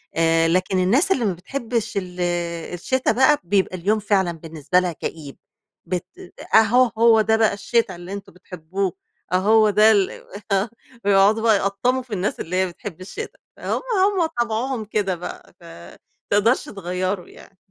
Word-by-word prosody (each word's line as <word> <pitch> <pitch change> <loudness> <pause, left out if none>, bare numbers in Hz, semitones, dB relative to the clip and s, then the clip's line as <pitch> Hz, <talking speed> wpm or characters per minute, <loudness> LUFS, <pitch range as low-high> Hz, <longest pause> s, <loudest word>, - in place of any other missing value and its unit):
آآ 165 0 +3
لكن 185 +2 +1
الناس 255 - +2
اللي 245 -10 +2
ما 195 - +1
بتحبش 230 +3 -4
ال 180 -2 -5 0.5
الشِتا 255 +7 0
بقى، 265 +4 +3
بيبقى 190 0 0
اليوم 210 +5 +1
فعلًا 195 -4 +1
بالنسبة 165 +1 -1
لها 180 -1 -1
كئيب 150 -3 -7 0.5
بت 180 -1 -3 0.5
أهو 235 +3 +5
هو 225 -1 +5
ده 220 +1 +2
بقى 220 -2 +3
الشِتا 230 0 0
اللي 175 +3 -9
أنتم 200 -1 -8
بتحبوه، 180 +1 -4 0.4
آه - - +2
هو 215 +3 +4
ده 210 +2 +5
ال 200 -3 +3 0.4
آه 195 +3 +1 0.4
ويقعدوا 200 +2 +4
بقى 220 -2 +5
يقطّموا 200 +7 0
في 240 -4 -10
الناس 195 +1 -2
اللي 180 +3 -4
هي 185 0 +2
بتحب 180 0 -9
الشِتا 420 - -8 0.2
هم - - -3 0.3
هم 385 -5 +1 0.2
طبعُهم 235 0 -2
كده 200 -3 -1
بقى 175 0 -9
ف - - -20 0.7
تقدرش 215 +5 +3
تغيره 185 -1 -3
يعني. 195 - -17
200 Hz, 160 wpm, -22 LUFS, 180-225 Hz, 0.7 s, أهو